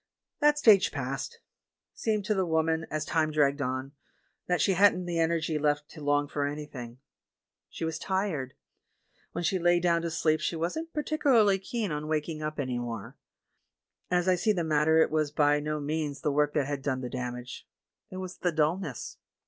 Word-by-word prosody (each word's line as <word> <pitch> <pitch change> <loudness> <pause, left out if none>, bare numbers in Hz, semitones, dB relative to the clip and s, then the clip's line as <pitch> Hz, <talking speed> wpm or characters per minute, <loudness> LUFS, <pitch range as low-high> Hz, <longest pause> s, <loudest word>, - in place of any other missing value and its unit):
"That 295 -1 +4
stage 215 -9 +6
passed. - - -4 0.5
Seemed 215 -3 -1
to 215 - +1
the 190 -2 +1
woman, 160 -1 0
as 155 -1 -2
time 160 0 +1
dragged 145 -2 +2
on, 130 +1 -2 0.6
that 180 0 +1
she 195 - +3
hadn't 185 -1 +4
the 170 -1 -2
energy 165 -1 +1
left 145 0 0
to 155 - -11
long 145 0 +1
for 145 0 -2
anything. 145 -5 -7 0.7
She - - -5
was 160 0 -3
tired. 185 -10 -2 0.8
When 175 - -3
she 185 +2 +1
lay 175 0 +4
down 170 -1 +2
to 170 - -2
sleep 155 -1 +1
she - - -1
wasn't 250 - -3
particulai'ly 265 -10 +3
keen 215 -2 -3
on 150 0 -3
waking 155 0 -2
up 155 0 -4
any 130 -3 -1
more. 115 -4 -6 0.9
As 180 0 +1
I 185 - +5
see 210 +4 +2
the 175 -4 -1
mat 155 -1 +1
ter, 160 0 +6
it - - -2
was 155 -1 +1
by 145 0 +3
no 150 +1 -2
means 145 -1 -3
the 150 - 0
work 150 +1 +1
that 145 -3 +2
had 145 0 -3
done 130 -2 -1
the 125 - -4
damage 125 0 -6 0.2
— - - -58
it 185 - -7
was 185 -1 -6
the 175 - 0
dullness. 155 - -1
155 Hz, 190 wpm, -29 LUFS, 145-180 Hz, 0.9 s, stage